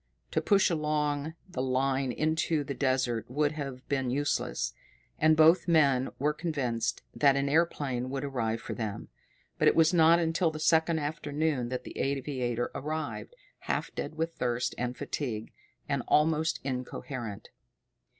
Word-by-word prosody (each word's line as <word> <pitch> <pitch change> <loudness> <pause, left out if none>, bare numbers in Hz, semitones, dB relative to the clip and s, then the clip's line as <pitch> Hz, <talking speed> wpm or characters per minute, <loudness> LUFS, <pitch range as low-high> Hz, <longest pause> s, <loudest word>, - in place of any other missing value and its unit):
To - - +1
push 195 -2 +3
along 150 -1 -1
the 155 -9 -4
line 130 0 +1
into 155 +2 0
the 140 - -4
desert 130 -5 0
would 145 +3 +1
have 135 -4 -6
been 135 -3 0
useless, 130 - -1 0.5
and 155 0 +5
both 160 +4 +6
men 140 -6 +4
were 150 +3 +1
convinced 130 -8 -2
that 140 -2 +4
an 140 0 +1
airplane 140 -5 0
would 135 +1 -3
arrive 115 -5 -2
for - - -5
them. 105 -3 -5 0.5
But - - +4
it - - +5
was 165 +1 +5
not 165 0 +6
until 165 +1 +1
the 155 -1 -6
second 160 +1 +3
afternoon 145 -3 -1
that 125 0 -3
the - - -8
aviator 130 -3 -1
arrived, 155 - -4 0.2
half - - -3
dead 155 - -5
with 165 +1 -2
thirst 120 0 -1
and 125 +1 -3
fatigue, 115 -7 -4 0.4
and - - 0
almost 155 +1 +2
incoherent. 125 -4 -5
140 Hz, 150 wpm, -29 LUFS, 125-155 Hz, 0.5 s, both